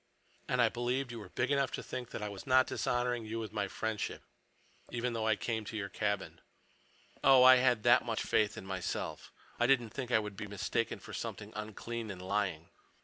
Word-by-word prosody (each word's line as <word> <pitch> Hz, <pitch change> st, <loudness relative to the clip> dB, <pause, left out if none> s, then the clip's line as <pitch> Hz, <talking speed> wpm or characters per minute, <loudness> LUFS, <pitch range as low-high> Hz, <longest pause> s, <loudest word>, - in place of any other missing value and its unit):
And 125 Hz, -1 st, +3 dB
I -, -, +6 dB
believed 125 Hz, +2 st, -1 dB
you 120 Hz, -, -6 dB
were 105 Hz, -, -10 dB
big 125 Hz, +3 st, -1 dB
enough 140 Hz, -1 st, +2 dB
to -, -, -3 dB
think 125 Hz, -2 st, -5 dB
that -, -, -5 dB
I -, -, -2 dB
was 100 Hz, +3 st, -9 dB
not 130 Hz, 0 st, +6 dB
dishonoring 120 Hz, -1 st, -1 dB
you 110 Hz, +1 st, -4 dB
with 110 Hz, -2 st, -5 dB
my—friendship, 105 Hz, +1 st, -2 dB, 0.7 s
even 120 Hz, 0 st, -2 dB
though 110 Hz, -1 st, -1 dB
I 110 Hz, -, +4 dB
came 110 Hz, 0 st, -2 dB
to 110 Hz, -, -5 dB
your 100 Hz, -1 st, -3 dB
cabin. 100 Hz, -1 st, -2 dB, 0.8 s
Oh, 135 Hz, -2 st, +8 dB
I 130 Hz, 0 st, +10 dB
had 125 Hz, -4 st, +3 dB
that 120 Hz, 0 st, +6 dB
much 115 Hz, -2 st, -2 dB
faith 105 Hz, -1 st, +1 dB
in -, -, -7 dB
myself—I 95 Hz, +5 st, -3 dB
didn't 120 Hz, -4 st, +3 dB
think 130 Hz, 0 st, -5 dB
I 120 Hz, -, +4 dB
would 105 Hz, -2 st, -3 dB
be 105 Hz, -, -6 dB
mistaken 105 Hz, +3 st, -1 dB
for -, -, -11 dB
something -, -, -5 dB
unclean 110 Hz, +2 st, -5 dB
and 95 Hz, -3 st, -6 dB
lying!" 95 Hz, -4 st, -2 dB
115 Hz, 200 wpm, -33 LUFS, 105-125 Hz, 0.8 s, I